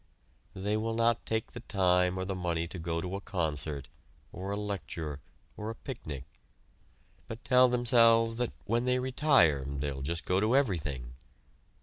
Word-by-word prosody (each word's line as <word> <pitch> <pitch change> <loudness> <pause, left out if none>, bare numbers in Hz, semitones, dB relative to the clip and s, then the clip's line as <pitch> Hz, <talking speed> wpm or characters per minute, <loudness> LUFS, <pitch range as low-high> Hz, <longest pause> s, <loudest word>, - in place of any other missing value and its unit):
They 105 +3 -1
will 115 +1 -2
not 115 0 +1
take 110 -1 -1
the - - -8
time 90 -2 +2
or 95 - -2
the 95 - -2
money 85 -2 -1
to 90 +1 -7
go 85 0 -2
to 90 +2 -4
a - - -8
concert, 75 -6 -2 0.5
or 95 +2 -5
a 100 - -2
lecture, 85 -8 -4 0.4
or 105 +1 -5
a 115 - -5
picnic, 70 - -7 1.0
but 115 +1 -8
tell 125 -1 +6
themselves 115 -2 +4
that 120 -1 -1
when 120 +3 0
they 125 0 +2
retire 130 - +3
they 70 +1 -3
will 70 0 -6
just 85 +4 -2
go 90 +1 +2
to 110 +5 +2
everything. 75 - 0
95 Hz, 165 wpm, -30 LUFS, 80-115 Hz, 1.0 s, tell